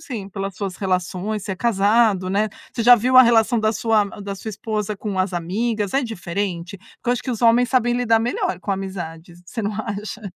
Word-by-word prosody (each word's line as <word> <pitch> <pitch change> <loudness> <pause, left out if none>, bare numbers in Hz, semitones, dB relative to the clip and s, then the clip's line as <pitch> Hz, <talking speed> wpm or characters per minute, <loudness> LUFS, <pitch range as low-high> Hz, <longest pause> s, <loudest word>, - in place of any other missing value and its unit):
sei, 205 -7 -7
pelas 195 -1 -4
suas 195 -3 -4
relações, 190 +2 -2
você 195 - -3
é - - -6
casado, 205 -3 +2
né? 210 +2 +1 0.2
Você 230 - -2
já 245 +2 +9
viu 255 +3 +2
a 255 - +11
relação 230 -1 +3
da 215 0 +2
sua 220 -1 +2 0.2
da 200 0 -5
sua 220 - -8
esposa 210 -1 -3
com 200 -2 -4
as 185 -1 0
amigas, 205 +4 -2
é 275 - +2
diferente? 185 -4 -4
Porque 235 - -12
eu - - +4
acho 245 - -3
que 260 - -4
os 235 0 -4
homens 235 +1 +5
sabem 245 -2 +2
lidar 230 -2 +3
melhor 230 -6 -1
com 190 - -4
amizades, 175 -3 -6
você 225 +5 -5
não 210 0 -2
acha? 215 0 -5
210 Hz, 215 wpm, -21 LUFS, 190-230 Hz, 0.2 s, a